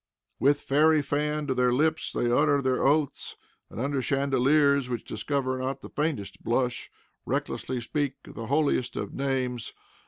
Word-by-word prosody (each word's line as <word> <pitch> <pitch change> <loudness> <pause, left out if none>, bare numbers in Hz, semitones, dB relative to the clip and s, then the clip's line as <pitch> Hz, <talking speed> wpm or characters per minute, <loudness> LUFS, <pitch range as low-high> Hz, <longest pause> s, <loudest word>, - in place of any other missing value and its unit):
With 145 +1 +3
fairy 155 +2 +3
fan 150 +2 -1
to 135 - 0
their 125 -1 +2
lips 155 +6 +1
they 120 - 0
utter 145 +3 +3
their 130 -2 0
oaths, 145 0 +1 0.3
and, - - -8
under 135 +2 0
chandeliers 140 0 +2
which 120 -2 -3
discover 130 +3 -2
not 130 +1 -3
the - - -9
faintest 145 -10 -3
blush, 120 0 -1 0.3
recklessly 130 -1 -2
speak 140 +3 -2
the 115 -1 -8
holiest 140 -3 +1
of - - -4
names. 130 -4 -2
135 Hz, 150 wpm, -27 LUFS, 125-145 Hz, 0.3 s, With